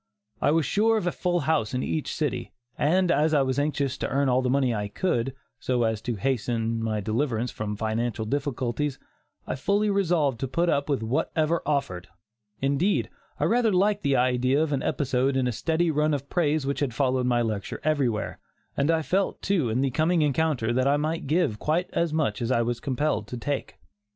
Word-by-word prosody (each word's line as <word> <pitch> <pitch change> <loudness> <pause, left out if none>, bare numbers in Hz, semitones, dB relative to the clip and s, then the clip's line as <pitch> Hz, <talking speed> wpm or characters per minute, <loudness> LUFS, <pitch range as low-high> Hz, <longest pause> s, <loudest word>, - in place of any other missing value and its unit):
I - - +3
was 160 0 +2
sure 225 +2 +2
of 210 - -2
a 175 - +1
full 175 0 0
house 140 -6 0
in 125 - -1
each 155 - -2
city, 150 -4 -2 0.2
and 180 +4 +2
as 155 +2 +3
I 140 - +4
was 130 +1 0
anxious 145 -2 -1
to - - -1
earn 140 0 +1
all 125 +1 +3
the 130 - 0
money 130 -2 +2
I 105 -2 -2
could, 125 - -1 0.2
so 125 -2 0
as 110 -2 0
to 120 0 -3
hasten 115 -1 -1
my 110 -2 -1
deliverance 115 +2 -1
from 105 -1 -4
financial 110 +1 -2
difficulties, 135 +1 -2 0.5
I - - -3
fully 205 +10 +1
resolved 165 - +1
to 135 - -2
put 170 +6 0
up 140 -1 0
with 135 -6 0
whatever 155 +7 0
offered 90 -12 -1 0.6
indeed, 140 +9 +1 0.3
I - - 0
rather 235 -2 +3
liked 205 +2 +2
the 140 -3 +1
idea 130 +2 +2
of 155 -2 -1
an 135 - 0
episode 135 -1 0
in 130 - +1
the 125 - +1
steady 165 +7 0
run 150 0 +2
of 140 0 -7
praise 155 -4 +1
which 140 +1 -1
had 135 -5 -1
followed 130 -2 +1
my 120 -1 +2
lecture 105 -3 -3
everywhere, 135 -8 0 0.4
and 140 +2 +1
I 165 -1 +2
felt, 190 +5 -1
too, 175 - +1
in 115 +4 0
the 135 -1 +1
coming 160 +4 +2
encounter 145 -5 +1
that 130 +2 +2
I 140 +1 +3
might 155 +1 -2
give 150 -8 +1
quite 165 +4 0
as 170 -2 +1
much 150 -10 0
as 120 +1 -1
I 120 -2 +3
was 120 0 -2
compelled 130 -5 -1
to 125 - -6
take. 140 +4 -3
140 Hz, 205 wpm, -26 LUFS, 120-160 Hz, 0.6 s, I